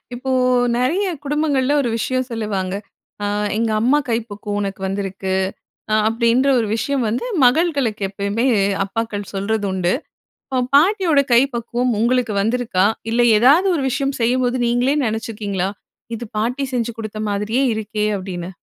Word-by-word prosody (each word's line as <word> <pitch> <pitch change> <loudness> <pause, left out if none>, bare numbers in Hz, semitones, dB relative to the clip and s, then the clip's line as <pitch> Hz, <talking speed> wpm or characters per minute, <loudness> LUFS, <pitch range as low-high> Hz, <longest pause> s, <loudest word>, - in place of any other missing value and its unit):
இப்போ 260 +2 -4 0.5
நிறைய 330 +11 +1 0.2
குடும்பங்கள்ல 290 -2 +1
ஒரு 240 - -1
விஷயம் 255 +3 -1
சொல்லுவாங்க. 200 -4 -2 0.5
அ - - 0 0.3
எங்க 225 -1 0
அம்மா 265 +5 +4
கை 225 - +2
பக்குவம் 205 0 -4
உனக்கு 195 -1 -4
வந்திருக்கு, 195 -1 -3 0.6
அ - - +4
அப்படின்ற 235 +4 +2
ஒரு 225 - 0
விஷயம் 270 +1 -1
வந்து 235 - -2 0.2
மகள்களுக்கு, 265 - +2
எப்பயுமே 200 +5 -1 0.4
அப்பாக்கள் 205 -1 -4
சொல்றது 200 +1 -1
உண்டு. 185 -1 0 0.6
இப்ப 255 -1 0
பாட்டியோட 340 -2 +4
கை 235 - +7
பக்குவம் 240 +1 -1
உங்களுக்கு 235 -1 +1
வந்திருக்கா, 225 -4 +1 0.3
இல்லை 240 +1 +3
ஏதாவது 300 - +5
ஒரு 280 - -1
விஷயம் 275 +1 -1
செய்யும்போது 250 +1 +1
நீங்களே 245 +4 +2
நினைச்சுருக்கீங்களா? 210 -4 -2 0.5
இது 235 +1 -6
பாட்டி 250 +6 -1
செஞ்சு 235 -1 -1
கொடுத்த 215 -1 -6
மாதிரியே 210 +6 0
இருக்கே 215 0 -2
அப்படின்னு. 180 -2 -6
230 Hz, 140 wpm, -20 LUFS, 205-255 Hz, 0.6 s, கை